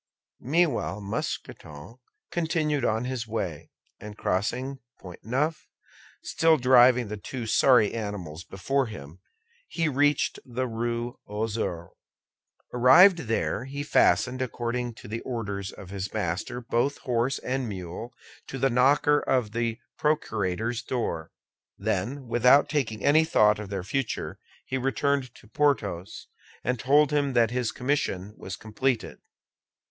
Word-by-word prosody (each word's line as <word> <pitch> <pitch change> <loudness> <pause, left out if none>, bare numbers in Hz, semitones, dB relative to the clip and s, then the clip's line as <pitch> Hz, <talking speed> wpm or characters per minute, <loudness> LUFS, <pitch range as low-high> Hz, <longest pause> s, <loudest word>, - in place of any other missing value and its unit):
Meanwhile 150 - 0
Mousqueton 100 - -6 0.3
continued 155 -4 0
on 110 +1 0
his 125 -3 -3
way, 95 -9 -4 0.3
and 105 0 -9
crossing 125 +8 -1
the - - -38 0.2
Pont 90 -2 -10
Neuf, 150 +7 -1 0.6
still 165 -1 +3
driving 125 -2 +5
the 105 +1 -5
two 120 +3 -6
sorry 110 -1 +4
animals 100 -8 -5
before 135 +9 -1
him, 75 -4 -10 0.5
he 165 -1 -1
reached 145 0 +1
the 130 +1 -3
Rue 120 +1 -3
aux 105 +2 -2 0.2
Ours. 85 -1 -5 0.8
Arrived 150 +10 +7
there, 115 +2 -1
he 140 +2 -5
fastened, 130 -3 +3
according 120 -1 -3
to - - -12
the 110 +3 -4
orders 100 -6 -4
of 95 -1 -11
his 95 -1 -4
master, 90 +8 -3
both 125 +4 0
horse 125 +2 0
and 130 -2 -3
mule 95 +4 -6 0.4
to 135 - -6
the 135 0 +1
knocker 140 +4 +4
of 125 -5 0
the 115 0 -1 0.2
procurator's 110 -6 -1
door; 115 -10 -3 0.5
then, 110 +7 -2
without 125 +4 +5
taking 110 -8 -2
any 155 +3 +5
thought 105 -9 +4
for 105 -1 -6
their 95 -2 -4
future, 135 +5 -3 0.3
he 130 - -2
returned 135 -1 0
to - - -17
Porthos, 105 -10 -1 0.4
and 125 -1 -1
told 145 +4 +4
him 145 -2 +1
that 115 -2 +3
his 125 -2 -1
commission 115 -7 -2
was 95 - -7
completed. 115 +2 -2
120 Hz, 135 wpm, -27 LUFS, 105-135 Hz, 0.8 s, Arrived